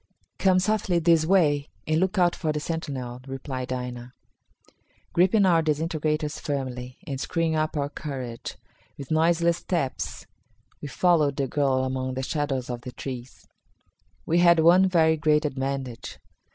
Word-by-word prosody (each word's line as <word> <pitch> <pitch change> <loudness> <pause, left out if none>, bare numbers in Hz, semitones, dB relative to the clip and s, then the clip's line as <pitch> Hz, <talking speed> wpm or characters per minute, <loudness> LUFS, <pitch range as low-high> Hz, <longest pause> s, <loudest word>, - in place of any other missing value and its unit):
"Come 190 -1 +4
softly 190 -2 +1
this 165 -1 +3
way, 150 -6 +3 0.2
and 155 0 +1
look 190 +3 0
out 175 -1 +3
for 155 -3 -1
the 150 - -2
sentinel," 135 -6 -5
replied 130 -1 -5
Aina. 125 -1 -5 1.0
Gripping 190 +4 +4
our 170 -3 +4
disintegrators 155 -1 -1
firmly, 130 -3 -4
and 135 -1 -4
screwing 165 -2 0
up 155 0 -1
our 140 -1 0
courage, 135 -5 -6 0.4
with 140 0 -9
noiseless 170 +1 +3
steps 165 -8 -3 0.6
we - - -5
followed 150 -1 +2
the 140 -2 0
girl 135 -1 +1
among 130 0 -2
the 130 - -3
shadows 135 -3 -2
of 120 -1 -5
the 125 0 -8
trees. 125 0 -8 0.8
We 170 +2 +2
had 170 -1 +6
one 180 +4 +6
very 160 -3 +3
great 150 0 +2
advantage. 135 -3 -4
150 Hz, 145 wpm, -25 LUFS, 130-170 Hz, 1.0 s, had